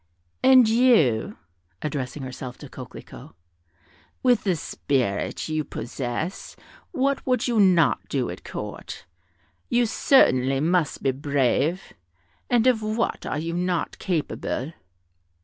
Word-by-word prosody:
"And 260 -2 +7
you," 220 - +3 0.5
addressing 140 -2 -4
herself 130 -1 -7
to - - -11
Coquelicot, - - -11 0.9
"with 250 -3 +3
the 185 -3 +2
spirit 130 -9 -2
you 155 -1 -1
possess, 130 +8 -5 0.3
what 275 +1 0
would 250 -2 +1
you 235 -3 +1
not 185 -4 +3
do - - -1
at - - -10
Court? - - -7 0.6
You 240 -1 +3
certainly 135 - +3
must 165 0 0
be 135 - +3
brave; 145 +5 0 0.6
and 240 -1 +3
of 250 -4 +3
what 215 +2 -2
are - - -2
you 165 +2 -3
not 175 -1 -2
capable?" 155 -5 -2
170 Hz, 115 wpm, -24 LUFS, 135-230 Hz, 0.9 s, And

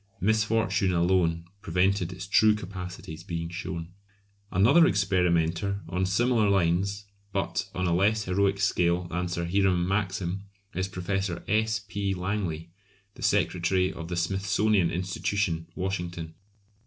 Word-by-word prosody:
Misfortune 110 -2 +2
alone 85 -1 +2 0.2
prevented 90 0 +1
its 90 +1 -7
true 105 +2 +5
capacities 90 -5 -7
being 85 -2 -4
shown. 85 -1 -5 0.6
Another 130 - +6
experimenter 90 -1 +1
on 95 +1 -1
similar 110 +2 +2
lines, 100 +2 +1 0.3
but 100 0 -2
on 90 - -1
a 85 - +2
less 105 +5 +2
heroic 100 +1 +1
scale 90 -3 +2
than 90 +1 -2
Sir 85 -1 -2
Hiram 90 -1 +2
Maxim, 95 -1 -1 0.3
is 95 +1 -1
Professor 95 -1 -3
S. 110 +1 +2
P. 100 -1 -2
Langley, 90 -4 -3 0.4
the - - -14
secretary 90 +1 +1
of 80 - -7
the 85 - -3
Smithsonian 95 +1 +2
Institution, 90 0 -1
Washington. 90 -3 -4
95 Hz, 125 wpm, -27 LUFS, 85-100 Hz, 0.6 s, Another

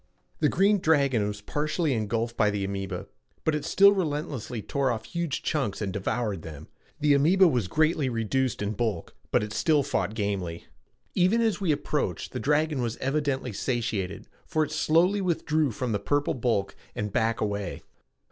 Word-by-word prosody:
The 150 - +3
green 200 +3 +3
dragon 140 - +2
was 105 0 -5
partially 150 - -1
engulfed 115 +1 -1
by 105 - +3
the 100 -1 -2
amoeba, 95 -1 -4 0.4
but 160 - +1
it 150 -1 -1
still 195 +5 +6
relentlessly 150 - -2
tore 135 +5 -1
off 110 -2 -2
huge 170 -1 -3
chunks 135 -10 -1
and 100 -3 -3
devoured 100 -1 -2
them. 80 -3 -10 0.3
The 150 -1 +4
amoeba 175 +7 +5
was 125 - +1
greatly 155 - +2
reduced 115 0 -1
in 100 - -1
bulk 110 -5 -3
but - - +2
it 105 0 -5
still 150 +5 +3
fought 110 - -1
gamely. 100 -6 -3 0.5
Even 185 +6 +3
as 220 -3 +1
we 180 -5 +2
approached 145 - -2
the - - -4
dragon 150 -1 +1
was 120 -2 -2
evidently 135 -3 -1
satiated, 105 -5 -2 0.2
for 155 - +1
it 150 - -4
slowly 170 +6 +3
withdrew 160 -4 +1
from 120 +1 -3
the 105 - 0
purple 145 +5 0
bulk 115 -6 -1 0.2
and 105 -1 -3
back 115 0 +1
away. 100 -4 -3
130 Hz, 170 wpm, -27 LUFS, 105-155 Hz, 0.5 s, still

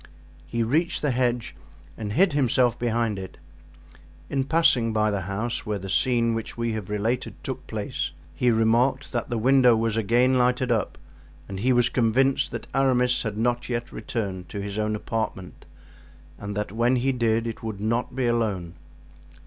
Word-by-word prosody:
He 115 -1 -1
reached 155 +10 0
the 145 - +2
hedge 120 -1 -1 0.4
and 105 -2 -5
hid 180 - +4
himself 125 -3 +2
behind 115 -3 0
it; 95 -1 -8 0.9
in 135 -1 0
passing 135 -8 +3
by 110 0 +2
the 100 -1 -1
house 110 +5 -2
where 105 -1 -2
the 95 0 -6
scene 115 +1 +2
which 115 +1 -5
we 115 0 -1
have 110 -3 -5
related 110 +4 -1
took - - -5
place, - - -3 0.2
he 125 - +1
remarked 120 +4 +2
that 145 - -2
the 120 - -1
window 125 +1 +5
was 115 0 0
again 120 +4 +3
lighted 125 0 +2
up 110 -4 0 0.5
and 95 -1 -6
he 125 +6 +2
was 120 0 +3
convinced 130 +3 +2
that - - -6
Aramis 125 -2 +2
had 105 -2 -4
not 120 +2 0
yet 120 -1 -3
returned 100 -5 -4
to 100 - -5
his 100 +1 -4
own 105 0 0
apartment 105 -4 -4 0.7
and 100 0 -5
that 105 -2 -2
when 120 +4 +2
he 130 +2 +1
did 115 -2 +1
it 115 -1 -5
would 110 -3 -5
not 115 +4 -1
be 130 -1 0
alone. 105 -8 -1
115 Hz, 175 wpm, -25 LUFS, 110-125 Hz, 0.9 s, window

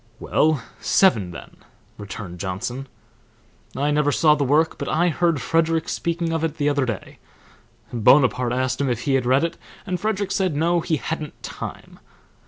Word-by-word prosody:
"Well, 155 -5 +1 0.2
seven 115 - +3
then," 85 -1 -11 0.4
returned 100 -3 -7
Johnson. 115 +8 -4 0.9
"I 145 +2 +1
never 150 0 +2
saw 150 +1 +4
the 145 -1 0
work, 150 +4 +2
but - - -3
I 170 +3 +2
heard 170 -2 +1
Frederick 165 +5 +1
speaking 170 -1 -2
of 165 0 -1
it 160 -1 -2
the 145 -1 +1
other 140 -3 0
day. 110 -5 -6 0.7
Bonaparte 125 +1 +4
asked 130 +2 -1
him 140 - +1
if 120 -1 -1
he 140 +1 0
had 130 -2 +1
read 130 +4 +3
it, 170 - -3 0.3
and 185 -3 -2
Frederick 205 -1 -1
said 190 -5 0
no, 170 +3 +2
he 165 -1 0
hadn't 155 0 -5
time. - - -8
145 Hz, 170 wpm, -22 LUFS, 125-165 Hz, 0.9 s, saw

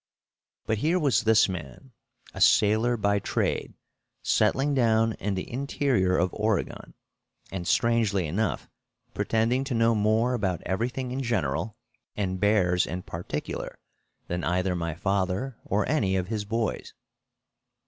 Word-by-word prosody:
But 110 -1 0
here 165 +8 +2
was 145 -9 +2
this 110 0 +5
man, 90 - -7 0.4
a - - -7
sailor 110 +3 +4
by 100 -1 +1
trade, - - -2 0.5
settling 145 +2 +2
down 115 -3 +3
in 100 -1 -2
the 95 - -4
interior 125 -7 0
of 90 +2 +1
Oregon, 105 -1 -2 0.6
and, 90 -2 -5
strangely 115 -6 +2
enough, 100 +8 -2 0.5
pretending 115 +4 +1
to 135 - -2
know 115 0 +3
more 110 +3 +2
about 95 -8 -1
everything 125 +6 -2
in 130 +2 -2
general 110 - -1 0.4
and 95 -2 -2
bears 95 -3 +3
in 90 +2 -5
particular 85 +1 -5 0.5
than 90 0 -3
either 90 +2 0
my 85 -2 -3
father 100 +6 -1
or 100 +1 0
any 110 -11 +1
of 95 0 -1
his 110 -2 -2
boys! 110 +1 -3
105 Hz, 135 wpm, -27 LUFS, 95-115 Hz, 0.6 s, this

